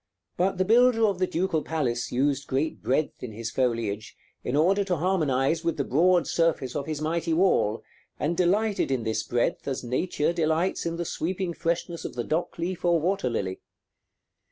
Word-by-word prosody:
But 190 Hz, +2 st, +1 dB
the 185 Hz, -, +2 dB
builder 230 Hz, +1 st, +5 dB
of 200 Hz, -4 st, 0 dB
the 185 Hz, -, +2 dB
Ducal 170 Hz, -2 st, 0 dB
Palace 125 Hz, -8 st, -2 dB
used 140 Hz, +2 st, 0 dB
great 140 Hz, +4 st, -1 dB
breadth 145 Hz, +4 st, -1 dB
in 120 Hz, -4 st, -6 dB
his 115 Hz, +1 st, -5 dB
foliage, 115 Hz, -4 st, -1 dB, 0.3 s
in 125 Hz, -, -2 dB
order 190 Hz, +7 st, +3 dB
to 185 Hz, -2 st, 0 dB
harmonize 160 Hz, -3 st, +1 dB
with 170 Hz, -1 st, -1 dB
the 140 Hz, -, +1 dB
broad 175 Hz, +6 st, +3 dB
surface 165 Hz, -7 st, 0 dB
of 140 Hz, -, -3 dB
his 155 Hz, -2 st, -3 dB
mighty 165 Hz, +1 st, 0 dB
wall, 140 Hz, -, +2 dB, 0.4 s
and 160 Hz, +3 st, 0 dB
delighted 195 Hz, +3 st, +1 dB
in 130 Hz, -3 st, 0 dB
this 110 Hz, -1 st, -1 dB
breadth 120 Hz, +1 st, -1 dB
as 135 Hz, -2 st, -2 dB
nature 150 Hz, +6 st, 0 dB
delights 165 Hz, +2 st, 0 dB
in 165 Hz, -, -2 dB
the 170 Hz, 0 st, -3 dB
sweeping 180 Hz, +2 st, -2 dB
freshness 170 Hz, 0 st, -2 dB
of -, -, -6 dB
the 120 Hz, -, -2 dB
dock 160 Hz, +7 st, -2 dB
leaf 170 Hz, +2 st, -3 dB
or 175 Hz, -1 st, +3 dB
water 175 Hz, -5 st, 0 dB
lily. 95 Hz, -5 st, -3 dB
160 Hz, 180 wpm, -26 LUFS, 130-180 Hz, 0.4 s, builder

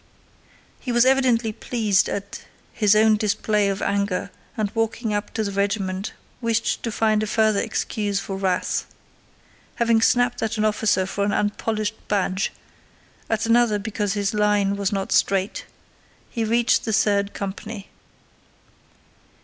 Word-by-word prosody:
He 250 Hz, -, -4 dB
was 240 Hz, +1 st, +4 dB
evidently 250 Hz, -4 st, +3 dB
pleased 215 Hz, -4 st, +1 dB
at 200 Hz, 0 st, -5 dB, 0.3 s
his 210 Hz, -2 st, +3 dB
own 215 Hz, 0 st, +5 dB
display 210 Hz, -1 st, +1 dB
of 195 Hz, 0 st, -2 dB
anger 200 Hz, -1 st, -1 dB, 0.3 s
and 210 Hz, -2 st, -1 dB
walking 225 Hz, 0 st, -1 dB
up 205 Hz, 0 st, -2 dB
to 220 Hz, -, 0 dB
the 200 Hz, -, -3 dB
regiment 200 Hz, -1 st, -1 dB, 0.3 s
wished 230 Hz, -1 st, 0 dB
to 230 Hz, -, -3 dB
find 215 Hz, -1 st, +2 dB
a 215 Hz, -, -1 dB
further 215 Hz, -1 st, +2 dB
excuse 210 Hz, -2 st, -2 dB
for 195 Hz, -1 st, -5 dB
wrath. 190 Hz, -1 st, -1 dB, 0.9 s
Having 230 Hz, -1 st, +2 dB
snapped 245 Hz, +2 st, +2 dB
at 225 Hz, 0 st, -1 dB
an 215 Hz, -, +1 dB
officer 210 Hz, -3 st, +2 dB
for 200 Hz, +1 st, -2 dB
an 205 Hz, -, +1 dB
unpolished 210 Hz, +1 st, -1 dB
badge, 195 Hz, -1 st, 0 dB, 0.8 s
at 225 Hz, 0 st, 0 dB
another 230 Hz, -2 st, +3 dB
because 205 Hz, -1 st, -2 dB
his 205 Hz, 0 st, -1 dB
line 210 Hz, -1 st, +2 dB
was 200 Hz, -1 st, -1 dB
not 195 Hz, -1 st, -2 dB
straight, 195 Hz, 0 st, +1 dB, 0.7 s
he 230 Hz, -, -2 dB
reached 235 Hz, +2 st, +2 dB
the 220 Hz, -, -2 dB
third 200 Hz, -1 st, +1 dB
company. 200 Hz, +1 st, -6 dB
210 Hz, 140 wpm, -23 LUFS, 200-225 Hz, 0.9 s, own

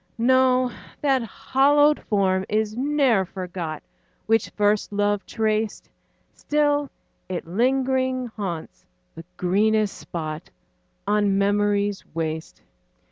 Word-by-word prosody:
No, 255 Hz, +1 st, +3 dB, 0.3 s
that 270 Hz, -3 st, +2 dB
hallowed 290 Hz, +6 st, +3 dB
form 190 Hz, -2 st, +2 dB
is 215 Hz, 0 st, 0 dB
ne'er 265 Hz, -5 st, +2 dB
forgot 180 Hz, -4 st, -6 dB, 0.4 s
Which 225 Hz, -1 st, +2 dB
first 210 Hz, 0 st, +1 dB
love 205 Hz, 0 st, 0 dB
traced; 220 Hz, -1 st, -1 dB, 0.4 s
Still 290 Hz, -1 st, 0 dB, 0.4 s
it 180 Hz, -2 st, -4 dB
lingering 260 Hz, +5 st, +1 dB
haunts 195 Hz, -8 st, -6 dB, 0.3 s
the 165 Hz, -, -10 dB
greenest 210 Hz, +3 st, +2 dB
spot 155 Hz, -2 st, -6 dB, 0.6 s
On 205 Hz, -1 st, +2 dB
memory's 205 Hz, 0 st, +1 dB
waste. 160 Hz, -1 st, -4 dB
210 Hz, 95 wpm, -24 LUFS, 195-255 Hz, 0.6 s, No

